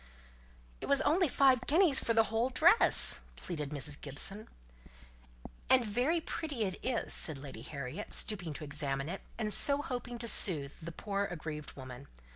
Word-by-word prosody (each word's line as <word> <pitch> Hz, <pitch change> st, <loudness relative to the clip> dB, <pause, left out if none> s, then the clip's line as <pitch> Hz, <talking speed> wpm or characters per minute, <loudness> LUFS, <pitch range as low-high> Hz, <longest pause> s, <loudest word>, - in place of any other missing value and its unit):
"It -, -, -6 dB
was 280 Hz, -1 st, +2 dB
only 350 Hz, +3 st, +1 dB
five 260 Hz, -2 st, +1 dB
guineas 320 Hz, -2 st, +4 dB
for 230 Hz, -, -2 dB
the 225 Hz, -, +4 dB
whole 230 Hz, +3 st, 0 dB
dress," 340 Hz, -, +5 dB
pleaded 150 Hz, -5 st, -7 dB
Mrs. 145 Hz, 0 st, -3 dB
Gibson. 195 Hz, +10 st, +1 dB, 1.2 s
"And 255 Hz, -2 st, +3 dB
very 250 Hz, +11 st, -1 dB
pretty 305 Hz, -6 st, -5 dB
it 190 Hz, -2 st, -6 dB
is," 250 Hz, -2 st, -2 dB
said 155 Hz, -4 st, 0 dB
Lady 135 Hz, 0 st, -11 dB
Harriet, 140 Hz, -1 st, -8 dB
stooping 180 Hz, -7 st, -2 dB
to 150 Hz, -, -7 dB
examine 140 Hz, -1 st, -4 dB
it, 190 Hz, -, -7 dB, 0.2 s
and 215 Hz, -2 st, -2 dB
so 285 Hz, 0 st, +3 dB
hoping 245 Hz, -2 st, -6 dB
to 235 Hz, 0 st, -5 dB
soothe 150 Hz, -10 st, +5 dB
the 170 Hz, +1 st, -8 dB
poor 200 Hz, +3 st, -4 dB
aggrieved 155 Hz, -4 st, -8 dB
woman. 130 Hz, 0 st, -11 dB
200 Hz, 160 wpm, -31 LUFS, -, 1.2 s, dress